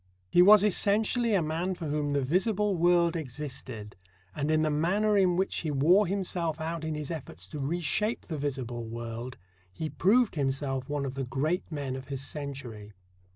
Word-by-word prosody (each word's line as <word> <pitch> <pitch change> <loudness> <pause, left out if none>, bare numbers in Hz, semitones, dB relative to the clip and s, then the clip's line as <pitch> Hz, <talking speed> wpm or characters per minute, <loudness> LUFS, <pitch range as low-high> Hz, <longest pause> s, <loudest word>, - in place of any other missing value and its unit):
He 175 - +6
was 205 +2 +8
essentially 215 +3 +2
a 180 - +2
man 165 +4 -2
for 170 - -6
whom 145 -1 -1
the 140 -1 +1
visible 195 - +1
world 170 0 +3
existed, 130 -7 -6 0.4
and 145 +1 -1
in 155 0 +3
the 155 - +1
manner 195 +8 +2
in 185 -3 +4
which 190 - 0
he 160 - -2
wore 170 +8 +4
himself 175 -4 -2
out 160 0 -3
in 160 -1 -2
his 150 0 -5
efforts 130 - -7
to 150 - -6
reshape 175 - -1
the 155 -4 -6
visible 130 -4 -3
world 115 +2 -6 0.3
he 155 +11 -5
proved 220 +5 +3
himself 135 -2 -2
one 145 -1 -1
of 130 - -4
the 135 0 -3
great 145 +9 -2
men 140 -4 -3
of 130 0 -8
his 135 0 -4
century. 130 -9 -7
155 Hz, 180 wpm, -29 LUFS, 135-180 Hz, 0.4 s, was